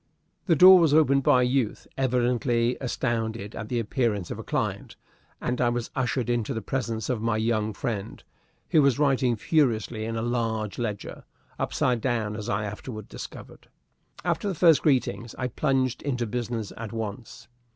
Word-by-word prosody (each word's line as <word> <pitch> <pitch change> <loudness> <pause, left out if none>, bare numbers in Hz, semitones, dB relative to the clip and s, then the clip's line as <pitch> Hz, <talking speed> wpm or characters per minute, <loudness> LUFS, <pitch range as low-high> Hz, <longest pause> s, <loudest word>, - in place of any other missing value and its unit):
The 170 - +4
door 185 +3 +9
was 160 -4 +4
opened 140 -3 +4
by 125 -1 +4
a - - +3
youth 125 -3 -1
evidently 125 -2 +1
astounded 115 -4 -2
at 110 - -6
the 125 - -1
appearance 110 - -1
of - - -5
a - - -6
client, - - -3 0.4
and 125 +1 -2
I 120 - +3
was 120 -1 -3
ushered 125 -1 -1
into 120 -3 -1
the 110 - -3
presence 115 -4 -2
of 120 -4 -1
my 115 -1 0
young 110 -1 0
friend, 105 -2 -5 0.5
who 155 - +5
was 140 -3 +3
writing 135 -4 +2
furiously 115 -4 0
in 115 0 -3
a 115 - -2
large 115 -3 -2
ledger 105 -4 -4 0.4
upside 125 -2 0
down, 110 -4 -1
as 105 +1 -5
I 105 -2 0
afterward 110 +1 -7
discovered. - - -10 0.6
After - - 0
the 195 - -1
first 165 -2 +5
greetings, 120 -6 0
I 125 -1 -2
plunged 130 -1 0
into 125 -4 -1
business 115 -2 -4
at 115 -2 -6
once. 115 0 -6
120 Hz, 170 wpm, -26 LUFS, 110-130 Hz, 0.6 s, door